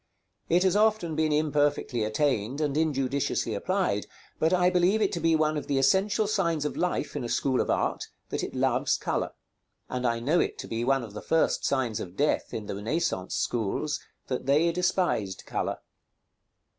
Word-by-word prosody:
It 175 +2 +4
has 190 0 +3
often 210 -6 +2
been 155 0 +1
imperfectly 145 -5 +1
attained 115 +2 0
and 145 -2 0
injudiciously 140 -6 0
applied, 105 - -1 0.3
but 160 - +2
I 180 0 +4
believe 180 +4 +3
it 205 -3 +2
to 170 - -2
be 165 0 +3
one 155 -1 +1
of 145 - -5
the 140 - 0
essential 195 +10 +3
signs 170 -8 0
of 150 - -2
life 180 0 -1
in - - -2
a 120 - -4
school 130 +1 +1
of - - -3
art, - - 0 0.2
that - - -2
it - - -5
loves - - +1
color; - - -2 0.6
and 125 -1 -1
I 115 0 0
know 150 +9 +2
it - - 0
to - - -7
be 115 +1 -2
one 135 0 +2
of 110 -3 -9
the 105 - -6
first 160 0 +1
signs 130 -6 0
of 90 0 -7
death 150 +1 +1
in 110 - -5
the - - -4
Renaissance 105 - -2
schools, 120 +7 -1 0.3
that 130 0 -4
they 155 +5 +4
despised 175 - 0
color. - - -2
150 Hz, 185 wpm, -27 LUFS, 120-175 Hz, 0.6 s, It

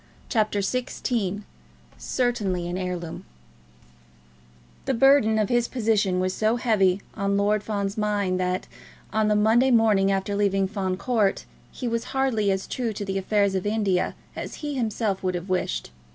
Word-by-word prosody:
CHAPTER 215 -3 +1
XVI 210 -2 -2 0.5
Certainly 205 -8 -1
an 175 - -3
Heirloom 180 -3 -4 1.6
The 265 - 0
burden 230 -3 +5
of 215 -2 +1
his 240 -1 +2
position 215 -6 +1
was 185 0 0
so 220 +3 +1
heavy 205 -6 +2
on 200 -1 0
Lord 205 +1 +2
Fawn's 205 -1 -3
mind 205 -3 0
that, 180 0 -1 0.5
on 215 0 +2
the 210 - +3
Monday 225 +5 +4
morning 215 -5 +4
after 195 +1 -1
leaving 195 -1 +1
Fawn 190 -2 -2
Court, 220 -4 0 0.3
he 250 - -5
was 230 0 -1
hardly 230 -7 +2
as 190 0 0
true 235 -4 -3
to 205 0 -5
the 195 0 -1
affairs 200 0 +1
of 190 +1 -1
India 205 -4 0 0.2
as - - -6
he 295 - -2
himself 220 -5 -1
would 185 -1 -1
have 175 +2 -5
wished. 60 - -1
205 Hz, 155 wpm, -25 LUFS, 190-225 Hz, 1.6 s, burden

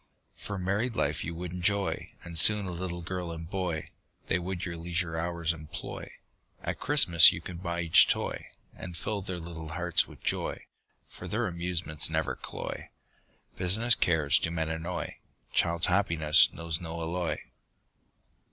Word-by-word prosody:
For 100 - -7
married 100 +6 -2
life - - -1
you 85 +1 -6
would 90 +1 -6
enjoy, 95 +2 -2
And 85 -1 -9
soon 105 +5 +9
a 90 - -5
little 85 0 -5
girl 90 0 -5
and 80 0 -8
boy, 90 -4 -4 0.3
They - - 0
would 90 0 -5
your 85 -2 -5
leisure 85 0 -2
hours 85 0 -1
employ, 75 -2 -9 0.5
At - - -4
Christmas 85 0 +7
you - - -6
could 85 0 -9
buy 85 -1 -3
each 80 -2 +6
toy, - - -3 0.3
And 90 -2 -9
fill 105 -2 -3
their 95 -2 -6
little 80 -1 -8
hearts 90 +1 +1
with - - -16
joy, - - -3 0.4
For - - -10
their 115 +3 -2
amusements 85 -4 0
never 80 0 -2
cloy, - - -8 0.7
Business 110 +7 +2
cares 80 -8 +2
do - - -2
men 80 -1 -3
annoy, 85 +1 -5 0.4
Child's 85 0 +2
happiness 85 -5 +4
knows 85 0 -4
no 85 -1 -6
alloy. 85 -1 -3
85 Hz, 155 wpm, -28 LUFS, 80-90 Hz, 0.7 s, soon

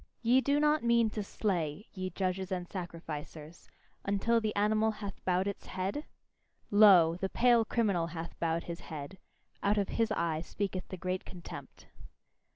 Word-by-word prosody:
Ye 245 +3 +5
do 285 +2 +2
not 300 -1 +3
mean 235 -2 +3
to 210 - -3
slay, 190 -3 -2
ye 185 -1 -3
judges 185 +1 -2
and 180 -1 -2
sacrificers, 165 -3 -7 0.3
until 225 +4 +2
the 215 -1 -2
animal 215 +2 +3
hath 210 -2 -6
bowed 185 +1 +2
its 200 - -5
head? 190 +11 -3 0.7
Lo! 190 -6 +7
the 190 +1 -2
pale 240 0 +4
criminal 200 -7 +1
hath 170 0 -6
bowed 165 0 0
his 170 0 -6
head: 155 +4 -8 0.4
out 205 +1 +2
of 200 -2 +1
his 225 -1 0
eye 165 -2 0
speaketh 190 +2 -4
the 185 - -7
great 185 +1 -2
contempt. 175 -2 -10
190 Hz, 160 wpm, -32 LUFS, 170-215 Hz, 0.7 s, Lo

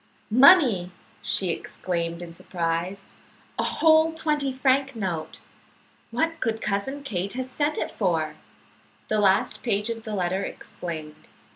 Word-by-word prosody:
"Money!" 250 - +6 0.3
she 185 -3 +1
exclaimed 170 0 -3
in 170 -1 -9
surprise. 170 +3 -3 0.5
"A - - +2
whole 320 0 +4
twenty 300 -4 0
franc 265 +1 +1
note. 180 -7 -4 0.7
What 325 +8 -1
could 225 -1 -1
Cousin 215 +9 -2
Kate 200 -7 -3
have 255 +1 -3
sent 295 +3 -1
it - - -2
for?" 165 -6 0 0.8
The 215 - +2
last 195 -2 +2
page 210 -1 0
of 225 -1 -5
the 215 -1 -5
letter 185 0 0
explained. 155 -5 -7
210 Hz, 130 wpm, -25 LUFS, 175-270 Hz, 0.8 s, Money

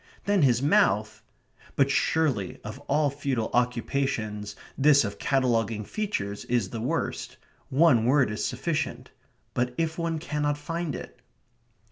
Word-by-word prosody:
Then 200 -2 +3
his 125 -3 +3
mouth 110 - +2 0.5
but 140 0 +3
surely, 135 - +1
of 105 +5 -7
all 150 -2 +2
futile 135 -5 -2
occupations 115 -4 -1 0.2
this 140 0 +5
of 100 0 -5
cataloguing 115 -5 +1
features 105 - -3
is 120 -1 0
the 115 - -4
worst. 120 - -2 0.3
One 135 -5 +4
word 130 -2 +3
is 105 - -3
sufficient. - - -2 0.4
But 125 0 -1
if 165 0 -1
one 165 -1 -1
cannot 150 -2 -1
find 165 +1 -3
it? - - -9
130 Hz, 130 wpm, -27 LUFS, 110-150 Hz, 0.5 s, this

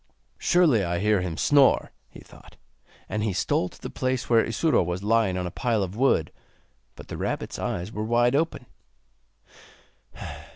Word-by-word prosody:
'Surely 160 - +3
I 85 -1 -1
hear 105 0 +2
him 85 -3 -4
snore,' 140 -2 +3 0.2
he - - -13
thought; - - -17 0.5
and 105 - -3
he 105 -3 -1
stole 90 0 0
to - - -18
the - - -7
place 130 -1 -2
where 115 -1 +5
Isuro 155 +8 +1
was 90 +2 -3
lying 105 -3 +2
on 90 - -2
a 90 - -4
pile 115 +1 0
of 95 +1 -6
wood, 120 - +2 0.6
but - - -12
the - - -6
rabbit's - - -4
eyes 90 +4 -3
were 105 -1 -4
wide 120 +3 +2
open. 160 -4 -1
110 Hz, 165 wpm, -25 LUFS, 90-125 Hz, 0.6 s, where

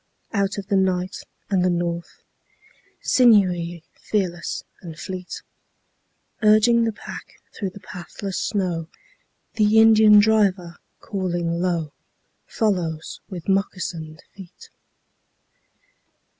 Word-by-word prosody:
Out 200 -1 0
of 200 - -5
the 200 0 0
night 185 -1 +1 0.4
and 190 -2 +2
the 185 - +3
north, 170 -1 -3 0.8
Sinewy, 180 -8 +3
fearless 180 -5 -3 0.2
and 165 -3 -9
fleet, 185 0 -7 1.0
Urging 220 +2 +5
the 225 - 0
pack 210 - -10 0.2
through 195 - -3
the 195 +2 -13
pathless 185 +2 -6
snow, 180 -6 -1 0.7
The 215 0 +4
Indian 220 -1 +7
driver, 200 -5 +3 0.2
calling 175 -4 -2
low, 170 -5 -1 0.5
Follows 175 -7 -2
with 180 -5 -8
moccasined 180 -5 -2
feet. 190 -3 -14
185 Hz, 100 wpm, -23 LUFS, 175-210 Hz, 1.0 s, Indian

